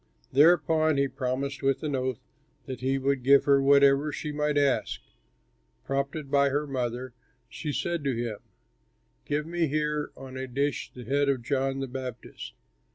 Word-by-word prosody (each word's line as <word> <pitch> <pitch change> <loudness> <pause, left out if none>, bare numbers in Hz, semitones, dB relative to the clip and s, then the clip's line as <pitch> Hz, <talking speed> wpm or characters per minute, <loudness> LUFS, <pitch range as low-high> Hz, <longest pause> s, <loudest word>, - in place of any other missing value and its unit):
Thereupon 155 0 +4
he 140 0 +2
promised 135 +1 -3
with 135 +1 0
an 145 -2 -1
oath 130 -2 -3 0.4
that 130 -2 -6
he 135 +1 +1
would 135 0 0
give 140 +2 +5
her 140 -1 +4
whatever 140 +1 +5
she 150 +1 -4
might 150 0 0
ask. 140 -2 +1 0.9
Prompted 140 +1 -3
by 140 0 +4
her 145 +2 0
mother, 125 -2 -3 0.3
she 150 - -5
said 170 +1 -2
to 135 -3 +1
him, 115 -3 -3 0.9
"Give 150 +1 -1
me 170 0 0
here 150 0 -1
on 130 0 -9
a 130 0 -4
dish 140 +3 -2
the 125 - -10
head 140 +2 +1
of 130 -4 0
John 135 +1 -1
the 135 - -3
Baptist." 125 -2 -7
140 Hz, 160 wpm, -27 LUFS, 130-145 Hz, 0.9 s, give